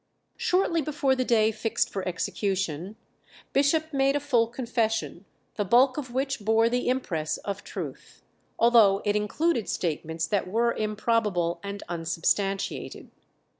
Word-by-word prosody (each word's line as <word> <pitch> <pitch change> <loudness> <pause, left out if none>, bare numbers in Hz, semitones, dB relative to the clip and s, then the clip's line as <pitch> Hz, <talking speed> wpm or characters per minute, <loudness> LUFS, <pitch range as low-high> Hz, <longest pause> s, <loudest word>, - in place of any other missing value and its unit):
Shortly 360 -3 +1
before 285 -2 0
the 255 - 0
day 220 -3 +3
fixed 220 +1 -1
for 190 -1 -4
execution, 185 0 -2 0.6
Bishop 315 +3 +2
made 275 0 +2
a - - +2
full 245 -5 +2
confession, 225 - -2 0.3
the 210 - +1
bulk 250 +6 +4
of 265 -5 -5
which 270 +1 -1
bore 225 +2 +3
the 245 +1 0
impress 170 -12 -1
of 200 0 -5
truth, - - -8 0.3
although 225 -4 +5
it 205 0 +1
included 230 +5 0
statements 160 -1 -2
that 205 -3 -1
were 230 +4 +1
improbable 210 -5 0
and 200 0 -6
unsubstantiated. 175 +4 -2
220 Hz, 130 wpm, -27 LUFS, 195-255 Hz, 0.6 s, although